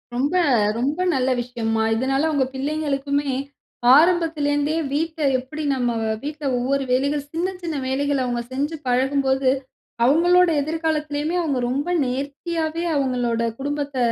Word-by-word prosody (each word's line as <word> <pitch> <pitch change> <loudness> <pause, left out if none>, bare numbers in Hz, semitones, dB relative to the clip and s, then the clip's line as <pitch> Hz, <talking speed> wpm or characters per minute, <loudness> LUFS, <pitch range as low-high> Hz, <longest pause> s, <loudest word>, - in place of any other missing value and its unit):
ரொம்ப 280 +6 0 0.4
ரொம்ப 275 +6 -1 0.2
நல்ல 260 -2 +1
விஷயம்மா. 230 -2 -2
இதனால 270 +6 +1
உங்க 275 -3 +2
பிள்ளைங்களுக்குமே, 285 0 -1 0.6
ஆரம்பத்திலேந்தே 310 -3 +2 0.2
வீட்ட 320 +2 -2 0.2
எப்படி 300 +5 -7
நம்ம 250 -2 0
வ - - -1 0.2
வீட்ல 300 +1 -6
ஒவ்வொரு 270 +3 0
வேலைகள், 280 +3 +1
சின்ன 340 +3 0 0.2
சின்ன 330 -2 -3
வேலைகள 280 +1 0
அவுங்க 240 -1 -1
செஞ்சி 285 +5 -2
பழகும்போது, 265 +1 +2 0.6
அவுங்களோட 350 +6 +5
எதிர்காலத்திலயுமே 310 0 -1
அவுங்க 285 -6 -1
ரொம்ப 280 +6 -1 0.2
நேர்த்தியாவே 315 +5 -3
அவுங்களோட 250 -4 0 0.2
குடும்பத்த 285 0 -3
285 Hz, 120 wpm, -22 LUFS, 260-310 Hz, 0.6 s, அவுங்களோட